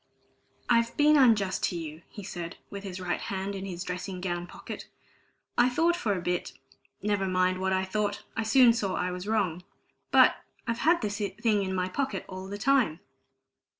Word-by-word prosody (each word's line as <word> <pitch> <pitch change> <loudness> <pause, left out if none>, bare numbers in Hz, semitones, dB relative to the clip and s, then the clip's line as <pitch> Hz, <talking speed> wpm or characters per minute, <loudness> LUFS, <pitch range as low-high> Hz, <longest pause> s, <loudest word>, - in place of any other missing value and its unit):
"I've 235 -1 +2
been 300 +1 +6
unjust 220 -9 +4
to 175 - -2
you," 160 -1 -6
he 205 - -9
said, 175 -3 -6
with 200 0 -6
his 190 -2 -6
right 180 -1 -2
hand 195 +1 -3
in 195 0 -5
his 180 -1 -5
dressing 180 0 -5
gown 175 -1 -3
pocket. - - -8 0.7
"I 240 +1 +6
thought 330 +7 +2
for 215 - 0
a 180 - -3
bit 180 0 -2 0.5
never 205 -2 +1
mind 185 0 +2
what 190 0 0
I 190 0 +1
thought 205 +1 -2
I - - 0
soon 235 +2 +6
saw 200 -5 -1
I 180 - -1
was 180 +2 -6
wrong. 195 -6 0 0.5
But - - +6 0.3
I've 230 -1 -2
had 335 +1 +3
this 205 -1 -2
thing 205 +1 0
in 190 -1 -2
my 185 0 0
pocket 270 +8 -2
all 185 0 -7
the 200 +1 -5
time!" 230 - +2
195 Hz, 185 wpm, -28 LUFS, 185-225 Hz, 0.7 s, been